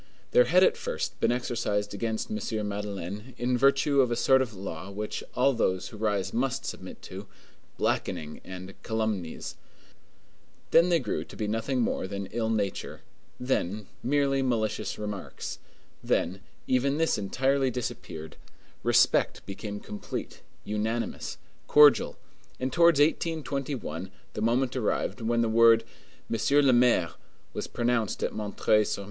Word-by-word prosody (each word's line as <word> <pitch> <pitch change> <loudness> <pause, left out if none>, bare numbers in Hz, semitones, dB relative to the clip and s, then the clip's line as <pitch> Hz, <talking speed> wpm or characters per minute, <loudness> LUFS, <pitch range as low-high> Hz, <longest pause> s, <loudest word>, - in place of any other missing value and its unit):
There - - +6
had - - +5
at 470 0 +4
first 485 +1 -3
been - - +3
exercised 115 -4 -1
against 110 - -2
M. 110 - -2
Madeleine, 105 +3 -5
in 125 +1 +1
virtue 140 +2 +4
of 125 - +2
a 120 - 0
sort 130 +2 +4
of 115 -5 -3
law 95 -1 -6
which 105 +2 -4
all 135 +2 +4
those 95 -6 0
who 110 - -10
rise 105 -3 -1
must 130 +2 -1
submit 95 - -7
to, 95 +2 -8 0.5
blackening 75 -1 -2
and 95 +1 -8
calumnies; 110 -7 -3 1.1
then 170 +2 +6
they 170 - +5
grew 120 -9 -2
to - - -13
be 105 - -2
nothing 115 +4 0
more 105 - 0
than 100 0 -4
ill 115 -1 -1
nature, 105 -3 -2 0.4
then 110 -5 -1 0.2
merely 135 0 +2
malicious 115 -5 -1
remarks, 105 -2 -5 0.4
then 95 +3 0 0.2
even 135 +3 +2
this 160 -8 +2
entirely 135 +6 +1
disappeared; 105 -11 -6 0.4
respect - - +3
became 105 +1 -6
complete, 105 - -6 0.2
unanimous, 110 +3 -2 0.3
cordial, 150 -1 +6 0.4
and 130 0 -2
towards 170 -2 +5
1821 140 - -1 0.2
the - - -4
moment 120 +3 +1
arrived 125 0 -1
when 115 +1 +1
the - - +1
word 115 0 +6 0.4
"Monsieur 125 +6 +3
le 135 -2 +5
Maire" 120 -9 +4 0.4
was - - -4
pronounced 120 -3 0
at - - 0
M. 105 -1 -4
sur 105 - +4
M. 105 - +2
115 Hz, 140 wpm, -28 LUFS, 105-130 Hz, 1.1 s, There